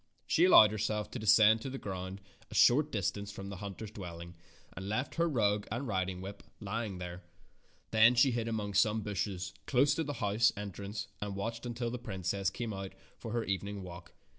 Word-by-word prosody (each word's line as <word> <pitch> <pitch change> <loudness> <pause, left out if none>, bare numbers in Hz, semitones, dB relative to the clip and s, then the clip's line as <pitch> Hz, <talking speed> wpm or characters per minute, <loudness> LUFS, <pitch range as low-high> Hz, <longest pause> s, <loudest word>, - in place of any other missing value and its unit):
She 170 - +4
allowed 110 - +8
herself 105 0 -2
to 125 - -5
descend 110 0 +6
to 135 - -4
the 135 - -5
ground 95 -3 -6 0.3
a - - -9
short 150 +5 +5
distance 100 0 -2
from 100 -1 -7
the 100 - -6
hunter's 100 +2 -7
dwelling 85 -3 -8 0.4
and 95 +1 -6
left 130 +6 -1
her 170 0 +1
rug 105 -6 +1
and 125 +5 -3
riding 95 -3 -1
whip 100 +2 -8 0.2
ly 110 +2 -3
ing 95 -3 -6
there. 90 0 -7 0.7
Then 110 +2 +6
she 125 +2 +5
hid 115 -1 -2
among 105 -3 -2
some 105 +2 +3
bushes 95 -3 -3
close 140 +2 +4
to 160 - -1
the 145 -1 -4
house 110 -1 +2
entrance 100 +1 -5
and 100 -1 -3
watched 115 +4 -4
until 120 0 -3
the 125 - -4
princess 95 -3 -2
came 110 +2 -4
out 95 -1 -6 0.3
for 115 - -6
her 120 0 0
evening 100 +1 -3
walk. 85 -1 -10
105 Hz, 195 wpm, -32 LUFS, 95-115 Hz, 0.7 s, allowed